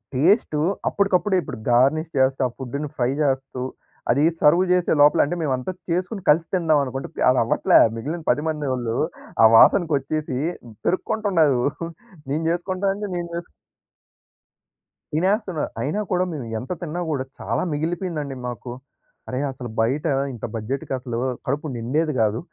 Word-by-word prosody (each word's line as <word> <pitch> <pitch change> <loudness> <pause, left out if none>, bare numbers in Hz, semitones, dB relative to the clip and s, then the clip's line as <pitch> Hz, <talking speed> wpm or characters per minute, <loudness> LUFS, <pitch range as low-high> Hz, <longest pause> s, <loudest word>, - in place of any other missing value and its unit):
Taste 155 - +3 0.3
అప్పడికప్పుడే 200 0 +2
ఇప్పుడు 140 -8 -7
garnish 140 +7 +3
చేస్తూ, 130 0 +2
ఆ - - -7
ఫుడ్‌ని 140 +3 -4
ఫ్రై 125 0 +1
చేస్తూ, 135 -2 -1 0.5
అది 140 +5 +3 0.2
సెర్వ్ 170 +5 +5
చేసే 180 -1 +1
లోపల 145 0 +6
అంటే, 150 - -3
మేమంతా 130 0 -1 0.2
చేసుకొని 185 +4 -1
కలిసి 160 +3 +4
తిందాం 160 -4 +3
అనుకుంటే 135 0 -5 0.2
అది 130 - +4
అవ్వట్లే. 115 - +4 0.2
మిగిలిన 155 +9 -4
10 130 +5 0
మంది 150 -2 -3
వాళ్ళు 120 -3 -2 0.5
ఆ - - +10
వాసనకొచ్చేసి 150 - +3 0.5
పెరుక్కుంటున్నారు. 175 - +2 0.7
నేను 150 +4 -1
చేసుకుంటాను 185 +3 -1
అంటే 205 -1 -4
నేను 175 -1 -3
చేసుకు 170 - -6 1.6
తినేస్తున్నారు. 185 0 0
అయినా 155 +10 -1
కూడా 180 0 +2
మేము 135 -6 -5
ఎంత 125 - -8
తిన్నా 175 +1 -3
కూడా 135 -3 -1 0.2
చాలా - - -1
మిగిలిపోయిందండి 160 -2 -3
మాకు. 120 0 -6 0.6
అరెయ్! 130 +3 -1
అసలు 125 -2 -7
బయట 135 +8 0 0.3
ఇంత 115 - -6
బడ్జెట్‌కి 120 +6 -3
అసలు 125 -2 -5 0.3
కడుపు 145 +2 -1
నిండేది 150 +7 0
కాదు. 110 +1 +1
150 Hz, 140 wpm, -23 LUFS, 130-175 Hz, 1.6 s, ఆ